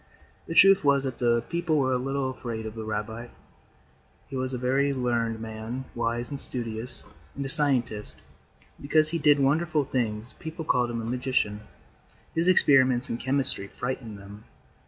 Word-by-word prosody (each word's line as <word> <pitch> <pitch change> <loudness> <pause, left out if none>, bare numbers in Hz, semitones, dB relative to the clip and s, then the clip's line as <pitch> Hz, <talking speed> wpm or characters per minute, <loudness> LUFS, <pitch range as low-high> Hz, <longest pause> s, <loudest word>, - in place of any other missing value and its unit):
The 165 - -4
truth 195 0 +7
was 140 -1 +3
that 130 -3 -4
the 120 -1 +2
people 170 -2 0
were 130 -2 +2
a - - +2
little 135 0 -1
afraid 115 -3 -5
of 110 - -5
the 110 -1 -6
rabbi. 110 +2 -4 1.0
He - - -6
was 130 0 -2
a 130 - -2
very 135 +3 +1
learned 120 -3 0
man, 110 +3 -6
wise 120 +1 -2
and 140 - -4
studious, 115 0 -6 0.3
and 140 - -4
a - - -4
scientist; 130 -8 +1
and - - -27
because 155 +2 +3
he 170 +1 -1
did 145 -1 +5
wonderful 155 +3 +2
things 115 -3 -2
people 160 -1 -6
called 125 -3 +2
him 115 -1 -3
a - - -5
magician. 125 -4 -1 0.7
His 165 +2 +1
experiments 130 -8 +4
in 115 - -1
chemistry 130 -6 +1
frightened 120 -2 -5
them. 100 +2 -12
125 Hz, 170 wpm, -27 LUFS, 115-140 Hz, 1.0 s, truth